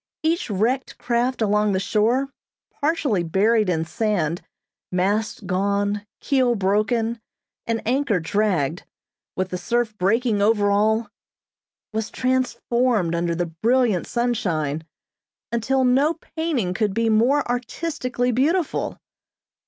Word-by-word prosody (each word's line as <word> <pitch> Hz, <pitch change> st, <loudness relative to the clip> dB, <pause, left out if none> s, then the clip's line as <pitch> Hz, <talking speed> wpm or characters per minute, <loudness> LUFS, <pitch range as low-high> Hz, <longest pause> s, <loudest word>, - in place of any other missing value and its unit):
Each 325 Hz, -3 st, 0 dB
wrecked 230 Hz, +7 st, -1 dB
craft 240 Hz, 0 st, 0 dB
along 210 Hz, 0 st, +2 dB
the 190 Hz, -, +1 dB
shore, 230 Hz, +7 st, +1 dB, 0.4 s
partially 285 Hz, -, 0 dB
buried 205 Hz, +5 st, +2 dB
in 165 Hz, -2 st, 0 dB
sand, 180 Hz, -5 st, -1 dB, 0.5 s
masts 200 Hz, +4 st, 0 dB
gone, 200 Hz, +2 st, -1 dB
keel 255 Hz, -4 st, +2 dB
broken, 220 Hz, +3 st, 0 dB, 0.5 s
and 230 Hz, -1 st, -1 dB
anchor 255 Hz, -5 st, +1 dB
dragged, 170 Hz, -4 st, 0 dB, 0.5 s
with 185 Hz, 0 st, -1 dB
the 180 Hz, -, -4 dB
surf 235 Hz, +3 st, -1 dB
breaking 215 Hz, +3 st, +2 dB
over 205 Hz, -1 st, +3 dB
all, 215 Hz, +2 st, +2 dB, 0.9 s
was 220 Hz, 0 st, -2 dB
transformed 250 Hz, -6 st, 0 dB
under 170 Hz, 0 st, 0 dB
the 175 Hz, +1 st, 0 dB, 0.2 s
brilliant 235 Hz, -5 st, +2 dB
sunshine, 165 Hz, -, -1 dB, 0.6 s
until 255 Hz, +3 st, +1 dB
no 275 Hz, +6 st, +3 dB
painting 315 Hz, -, -2 dB
could 205 Hz, -1 st, -1 dB
be 230 Hz, 0 st, +1 dB
more 240 Hz, +7 st, +3 dB
artistically 250 Hz, 0 st, -2 dB
beautiful. 310 Hz, +8 st, 0 dB
220 Hz, 115 wpm, -23 LUFS, 195-250 Hz, 0.9 s, over